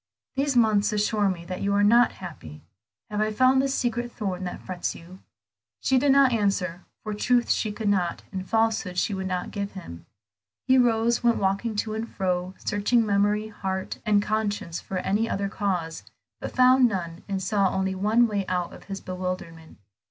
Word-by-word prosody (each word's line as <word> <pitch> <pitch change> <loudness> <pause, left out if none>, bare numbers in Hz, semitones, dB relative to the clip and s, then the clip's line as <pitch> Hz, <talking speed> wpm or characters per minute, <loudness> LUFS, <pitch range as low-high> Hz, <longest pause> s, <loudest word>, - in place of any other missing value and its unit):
These 275 -1 +1
months 215 -2 +3
assure 210 -1 +1
me 170 -2 -4
that 185 +1 -5
you 200 0 +1
are 205 - +3
not 235 +3 +5
happy; 115 - -10 0.5
have 210 0 -1
I 215 0 +1
found 255 +4 +4
the 275 - +1
secret 240 -3 -1
thorn 190 -5 -4
that 180 - -5
frets 180 -2 -4
you?" 180 +3 -13 0.6
She 265 -1 +2
did 280 +1 +3
not 275 -1 +5
answer, 195 -5 -1 0.2
for 215 - -4
truth 240 +3 +2
she 215 - 0
could 215 0 -4
not, 185 -4 0
and 190 -1 -6
falsehood 220 -5 +1
she 200 - +1
would 190 -1 -3
not, 180 -1 -3
give 200 -1 -4
him. 85 - -10 0.6
He 260 0 +5
rose, 235 -1 +2
went 235 -1 +3
walking 200 +3 0
to 215 +1 -2
and 220 +1 -4
fro, 185 -1 -2
searching 220 +3 +1
memory, 210 +1 +1
heart, 190 -3 -4
and 210 -2 +3
conscience 205 -5 -2
for 190 - -5
any 210 +5 0
other 200 0 -1
cause, 180 -5 -2 0.4
but - - -6
found 255 0 +6
none, 175 -3 -4
and 195 -1 -1
saw 195 +1 +1
only 190 0 -1
one 215 +5 +3
way 205 -2 -1
out 180 -1 -2
of - - -13
his 195 -1 -6
bewilderment. 180 -3 -6
205 Hz, 185 wpm, -25 LUFS, 185-225 Hz, 0.6 s, found